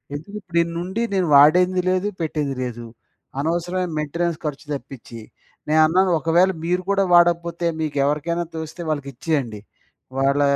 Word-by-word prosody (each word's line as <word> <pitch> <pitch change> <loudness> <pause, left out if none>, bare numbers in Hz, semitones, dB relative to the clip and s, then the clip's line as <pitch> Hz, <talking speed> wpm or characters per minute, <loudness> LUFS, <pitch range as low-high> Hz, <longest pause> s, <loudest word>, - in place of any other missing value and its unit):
ఎందుకు 160 +8 -8
ఇప్పుడిన్నుండి 170 +3 -2
నేను 185 -3 +1
వాడింది 180 +5 +5
లేదు 185 +2 +1
పెట్టింది 150 -3 -2
లేదు. 120 -1 -6 0.5
అనవసరమైన 175 +4 -1
మెయింటెనెన్స్ 170 +2 -2
ఖర్చు 150 0 -4
తప్పిచి. 130 -4 -8 0.5
నేను 155 +1 +4
అన్నాను 185 +4 +3
ఒకవేళ 175 +4 +3
మీరు 180 +1 0
కూడా 195 0 +3
వాడకపోతే 170 0 +3
మీకెవరికైనా 150 +3 0
తోస్తే 160 +2 -6
వాళ్ళకి 145 -3 -2
ఇచ్చేయండి. 130 -6 -2 0.6
వాళ్ళ 140 +1 +2
165 Hz, 125 wpm, -22 LUFS, 145-175 Hz, 0.6 s, వాడింది